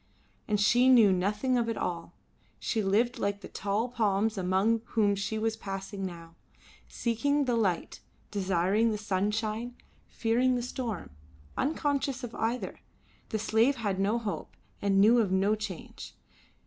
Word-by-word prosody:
And 210 -1 +1
she 245 +5 +4
knew 225 -7 +7
nothing 210 +7 +1
of 230 -1 0
it 230 - -2
all. 170 -1 -4 0.4
She 220 - -1
lived 230 +6 +1
like 200 -1 -1
the - - -8
tall 205 +4 -1
palms 220 -3 +1
amongst 195 +4 +1
whom 210 -3 +3
she 200 +2 -3
was 220 0 0
passing 195 -1 -5
now, 165 -2 -10 0.5
seeking 285 +5 0
the 245 -2 +1
light, 190 -7 -1 0.3
desiring 195 +3 +1
the 215 - -1
sunshine, 215 +4 -2 0.3
fearing 245 +3 +1
the 245 - -2
storm, 235 -6 -4 0.4
unconscious 280 -3 -1
of 240 -1 -6
either. 235 +3 -2 0.5
The 220 - -1
slave 225 +5 +2
had 205 -6 -2
no 205 +4 +2
hope, 220 -4 -5 0.2
and 195 -1 +2
knew 225 +4 +6
of 205 -5 +1
no 195 +2 +3
change. 215 -5 -6
215 Hz, 150 wpm, -29 LUFS, 195-235 Hz, 0.5 s, knew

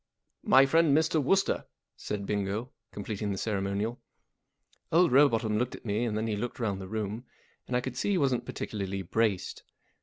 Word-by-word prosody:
" - - -51
My 135 - +9
friend 155 0 +4
Mr. 160 -1 +2
Wooster," 195 +8 +2 0.3
said 100 -1 -4
Bingo, 105 +4 -2 0.2
completing 105 0 -4
the 95 - -3
ceremonial. 100 +3 -2 0.9
Old 170 -2 +4
Rowbotham 115 -6 +4
looked 125 +1 -1
at - - -14
me 105 +2 0
and 110 -2 -1
then 110 - -1
he 110 -2 -1
looked 120 +5 -4
round 100 -5 -1
the 95 - -7
room, 110 +2 -4 0.4
and 125 - 0
I - - 0
could 125 -1 -5
see 130 - -1
he 200 - +2
wasn't 135 -6 +1
particularly 100 -2 -4
braced. 100 0 -1
110 Hz, 180 wpm, -29 LUFS, 100-130 Hz, 0.9 s, My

